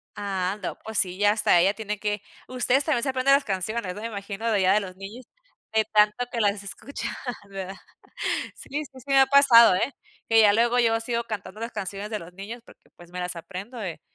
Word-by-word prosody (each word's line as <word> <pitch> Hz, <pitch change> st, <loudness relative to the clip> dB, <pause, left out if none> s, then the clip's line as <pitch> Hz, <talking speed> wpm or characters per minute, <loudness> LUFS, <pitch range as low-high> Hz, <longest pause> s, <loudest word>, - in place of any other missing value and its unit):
Ando, 195 Hz, -1 st, -3 dB
pues, 220 Hz, -1 st, -5 dB
sí 185 Hz, -1 st, +1 dB
ya 205 Hz, 0 st, +4 dB
hasta 210 Hz, -5 st, +3 dB
ella 190 Hz, +4 st, +4 dB
tiene 210 Hz, -2 st, -5 dB
que 210 Hz, -1 st, -2 dB, 0.3 s
ustedes 255 Hz, +2 st, +1 dB
también 270 Hz, -7 st, 0 dB
se 275 Hz, -, +1 dB
aprenden 260 Hz, +1 st, +3 dB
las 280 Hz, -, +1 dB
canciones, 195 Hz, 0 st, -3 dB
¿no?, 210 Hz, -, -7 dB
me 225 Hz, -, -3 dB
imagino 205 Hz, +1 st, -4 dB
de 215 Hz, -, +2 dB
allá 190 Hz, -1 st, +4 dB
de 210 Hz, -, +4 dB
los 185 Hz, -2 st, -7 dB
niños 205 Hz, +6 st, -10 dB, 0.5 s
de 220 Hz, -1 st, +3 dB
tanto 210 Hz, +3 st, +4 dB
que 235 Hz, -, -3 dB
las 205 Hz, -1 st, +1 dB
escuchan 260 Hz, +7 st, -6 dB, 0.4 s
¿verdad? 195 Hz, 0 st, -6 dB, 0.8 s
Sí, -, -, -13 dB, 0.2 s
sí, 260 Hz, -1 st, -14 dB
sí -, -, -16 dB
me 275 Hz, -1 st, +4 dB
ha 270 Hz, -, +7 dB
pasado, 245 Hz, -7 st, +7 dB
¿eh?, 240 Hz, +9 st, -1 dB, 0.4 s
que 225 Hz, -, +6 dB
ya 205 Hz, -1 st, +6 dB
luego 235 Hz, +2 st, +3 dB
yo 225 Hz, -1 st, +3 dB
sigo 235 Hz, 0 st, -2 dB
cantando 215 Hz, -1 st, -6 dB
las 230 Hz, +1 st, -4 dB
canciones 200 Hz, +2 st, -5 dB
de 215 Hz, -1 st, -3 dB
los 170 Hz, 0 st, -12 dB
niños, 210 Hz, +6 st, -8 dB
porque, -, -, -20 dB
pues, 175 Hz, 0 st, -16 dB
me 180 Hz, -, -6 dB
las 180 Hz, 0 st, -3 dB
aprendo 195 Hz, +8 st, -8 dB
de 190 Hz, -7 st, -5 dB
210 Hz, 220 wpm, -25 LUFS, 195-235 Hz, 0.8 s, ha